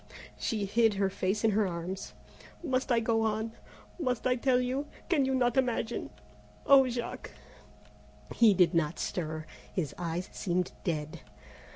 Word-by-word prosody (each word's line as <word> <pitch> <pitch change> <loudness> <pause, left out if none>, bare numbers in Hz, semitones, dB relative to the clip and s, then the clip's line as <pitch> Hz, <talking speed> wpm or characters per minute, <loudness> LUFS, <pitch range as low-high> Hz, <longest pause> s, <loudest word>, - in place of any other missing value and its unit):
She 215 -3 -2
hid 220 +1 +3
her 195 -1 +1
face 195 +2 -1
in 225 - +4
her 210 0 +2
arms. 180 +2 -5 0.5
"Must 260 -4 0
I 235 - +4
go 225 0 +1
on? 220 0 -1 0.5
Must 250 -7 -1
I 255 -1 +3
tell 250 0 +2
you 260 +3 -1 0.2
can 295 -6 +3
you 265 0 +1
not 245 -1 +2
imagine, 240 -2 0 0.6
oh! 270 -2 +7
Jack 240 -1 -4 0.5
" - - -17
He 215 -4 +7
did 180 0 +4
not 165 -1 +1
stir; 155 -3 -3 0.3
his 160 -7 -2
eyes 175 +1 -3
seemed 180 -1 -1
dead. 155 -1 -3
220 Hz, 155 wpm, -30 LUFS, 180-250 Hz, 0.6 s, oh